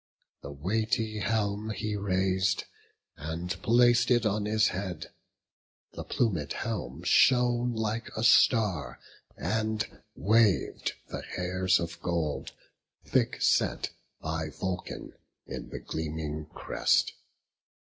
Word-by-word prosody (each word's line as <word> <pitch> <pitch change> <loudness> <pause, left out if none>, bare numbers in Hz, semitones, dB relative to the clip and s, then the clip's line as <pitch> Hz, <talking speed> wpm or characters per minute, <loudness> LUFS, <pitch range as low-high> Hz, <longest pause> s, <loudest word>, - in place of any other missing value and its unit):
The - - -8
weighty 110 +7 -1
helm 105 0 0
he 105 -1 -2
rais'd, 95 -1 +1 0.5
And 80 +4 -4
plac'd 120 +1 +4
it 120 -2 +3
on 105 0 +1
his 105 0 +3
head; 90 -4 -5 0.8
the - - -6
plumed 85 - 0
helm 65 +8 -4
Shone 120 +3 +4
like 110 +1 -2
a 110 - -1
star; 110 - +4 0.4
and 110 0 -2
wav'd 110 -2 +2 0.2
the - - -5
hairs 90 +1 +1
of 85 0 -5
gold. 85 -4 -2 0.5
Thick - - +1
set - - +2 0.3
by 80 0 -3
Vulcan 95 +4 -5 0.3
in - - -7
the - - -6
gleaming 80 -1 -4
crest. - - +1
100 Hz, 105 wpm, -29 LUFS, 85-110 Hz, 0.8 s, plac'd